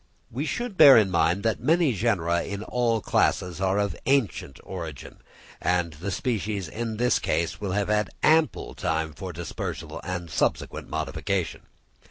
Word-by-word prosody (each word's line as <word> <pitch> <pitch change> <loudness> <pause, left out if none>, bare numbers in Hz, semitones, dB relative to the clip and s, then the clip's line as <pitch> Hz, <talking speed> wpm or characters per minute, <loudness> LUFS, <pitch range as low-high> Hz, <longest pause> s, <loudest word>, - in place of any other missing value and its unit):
We 135 +7 -3
should 240 +2 -3
bear 140 -7 +10
in 105 -4 +3
mind 85 +2 +2
that 110 -2 0
many 160 +1 +3
genera 90 -6 +1
in 100 +1 -5
all 115 -2 0
classes 90 -1 +1
are 95 +1 +1
of 100 -1 0
ancient 120 - 0
origin, 85 -6 -8 0.4
and 90 -2 0
the 85 +6 -5
species 105 -3 -2
in 110 +5 -4
this 125 +2 +2
case 85 +3 -1
will 100 -3 -2
have 100 0 0
had 105 -2 +1
ample 160 0 +3
time 80 -1 -2
for 90 +4 -6
dispersal 85 0 -6
and 90 -3 -5
subsequent - - -1
modification. - - -3
100 Hz, 155 wpm, -26 LUFS, 85-115 Hz, 0.4 s, bear